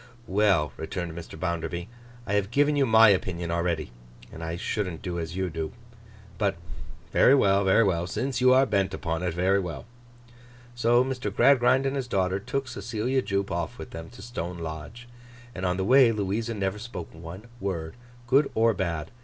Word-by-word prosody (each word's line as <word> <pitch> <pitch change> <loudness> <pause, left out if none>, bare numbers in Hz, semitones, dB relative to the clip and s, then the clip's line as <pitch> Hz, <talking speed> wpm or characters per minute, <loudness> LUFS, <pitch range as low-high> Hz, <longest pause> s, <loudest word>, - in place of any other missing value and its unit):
'Well,' 95 -8 +2
returned 85 -2 -4
Mr. 80 -2 -9
Bounderby, 85 0 -3 0.4
'I 100 - -3
have 100 -1 +1
given 145 +5 +2
you 140 -2 +2
my 110 0 +7
opinion 90 -3 0
already, 85 -4 -1 0.4
and 80 - -8
I 80 0 -3
shouldn't 95 -3 -3
do 90 -1 -3
as 80 0 -5
you 95 -2 -2
do. 80 -1 -4 0.7
But, 100 -2 +1 0.6
very 135 - +6
well, 100 -6 +3
very 95 +4 +4
well. 90 -4 0
Since 125 +5 -2
you 130 0 +6
are 130 +1 +6
bent 95 -5 0
upon 80 -2 -3
it, 90 -2 -2
very 95 +3 +2
well!' 90 -4 -5 0.9
So, 120 +1 +3
Mr. 130 -5 -3
Gradgrind 130 +3 +4
and 135 +1 0
his 135 -2 -2
daughter 95 -3 0
took 135 +6 -3
Cecilia 120 +4 -2
Jupe 100 -3 -2
off 85 -1 -3
with - - -9
them 80 0 -8
to 95 - -11
Stone 90 -7 -5
Lodge, 80 +9 -7 0.5
and 95 -3 -2
on 90 0 0
the 95 - -1
way 130 +1 +6
Louisa 110 +2 -2
never 100 0 -2
spoke 105 -6 -7
one 85 +5 -9 0.2
word, 85 -6 -3 0.3
good 135 +4 +3
or 115 +1 +4
bad. 85 -5 -3
95 Hz, 180 wpm, -26 LUFS, 85-115 Hz, 0.9 s, my